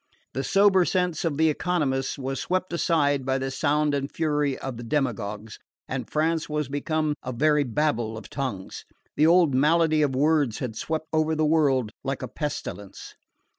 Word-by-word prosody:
The 135 - -2
sober 195 +1 +4
sense 180 -3 0
of 150 -4 -1
the 160 0 +4
economists 150 -5 -1
was 135 0 -3
swept 185 -1 -2
aside 145 -5 +1
by 130 +1 0
the 135 0 -3
sound 150 +1 +1
and 140 0 -2
fury 150 -3 0
of 130 -3 -6
the 120 - -7
demagogues, 110 -6 -3 0.3
and 130 -3 -4
France 160 +1 0
was 150 -2 -1
become 155 +2 -1
a 130 - -5
very 150 +4 +2
Babel 120 -4 -1
of 110 - -9
tongues. 130 -9 -5 0.3
The 155 - +4
old 170 -4 +5
malady 155 +3 +3
of 140 -3 +1
words 145 -4 +2
had 120 -4 -4
swept 160 +6 -3
over 155 0 +2
the 155 0 +1
world 140 -7 +2
like 135 0 -3
a - - -3
pestilence. 105 - -6
145 Hz, 170 wpm, -25 LUFS, 130-155 Hz, 0.3 s, old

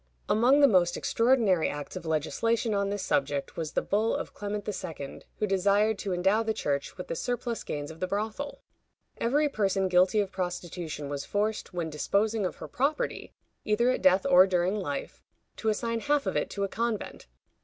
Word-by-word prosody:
Among 250 +7 +4
the 280 - +8
most 180 -5 +3
extraordinary 230 -8 +2
acts 145 +3 -6
of 180 -3 -6
legislation 220 - 0
on 200 0 0
this 205 -1 -3
subject 140 0 -1
was 160 -2 -4
the - - 0
bull 215 +3 +1
of - - -5
Clement 205 0 -4
II., 160 -8 -5 0.2
who 215 - 0
desired 200 +2 +2
to 200 - -3
endow 190 +5 +2
the 220 -1 -1
Church 140 -1 -2
with 180 - -6
the - - -3
surplus 240 +2 -3
gains 145 +1 -4
of 160 - -12
the 185 - -1
brothel. 220 +9 -4 0.6
Every 290 +6 +2
person 195 -7 +1
guilty 185 +3 +4
of 200 -2 0
prostitution 175 -5 -4
was 140 0 -4
forced, 210 +1 -2
when 170 -3 -3
disposing 200 +7 +1
of - - -7
her - - -8
property, 300 - -2 0.3
either 235 +4 +2
at - - -2
death 185 0 +4
or 185 +1 +7
during 180 +1 +1
life, 145 -7 -5 0.4
to 220 - 0
assign 230 +1 -1
half 290 +3 +1
of - - -2
it - - 0
to 200 - -3
a - - +1
convent. 230 +1 -3
200 Hz, 185 wpm, -28 LUFS, 175-225 Hz, 0.6 s, the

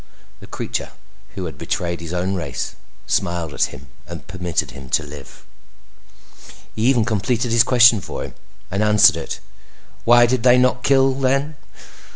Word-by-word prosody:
The - - -13
creature - - -4 0.5
who 95 - -4
had 80 - -8
betrayed 85 0 -3
his 85 -1 -7
own 90 +2 -1
race 90 -4 -4 0.3
smiled 85 -4 -1
at - - +2
him 65 - -11 0.2
and 85 0 -9
permitted 90 -2 -3
him 70 -2 -11
to 80 - +1
live. 75 -1 -12 1.3
He 110 - -4
even 125 -4 +3
completed 115 +2 -1
his 115 0 +5
question 120 -4 +5
for - - -6
him, - - -8 0.4
and 95 +2 -1
answered 105 -5 +5
it. 80 - -6 0.6
"Why 120 +1 +6
did 125 0 0
they 125 +1 +5
not 125 0 +2
kill 135 0 +3
then? 135 +3 0
105 Hz, 160 wpm, -20 LUFS, 85-125 Hz, 1.3 s, Why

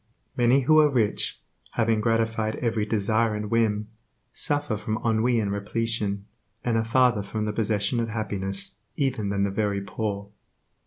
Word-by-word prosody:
Many 125 +3 +4
who 155 +4 +5
are 150 -1 +6
rich, 115 -7 0 0.3
having 115 -2 +2
gratified 115 -1 +1
every 110 -3 -1
desire 110 +1 +1
and 105 0 -4
whim, 110 -2 +1 0.4
suffer 145 -5 0
from 110 +1 -2
ennui 115 +1 +2
and 100 -2 -1
repletion, 100 -1 -1 0.4
and 120 -2 +1
are 115 - +2
farther 120 -1 +3
from 105 +1 -3
the 105 - -2
possession 105 +1 0
of 115 -1 -1
happiness 100 -3 -3 0.2
even 130 -8 0
than 100 0 0
the 100 - 0
very 100 0 0
poor. 100 0 -4
110 Hz, 155 wpm, -26 LUFS, 105-115 Hz, 0.4 s, are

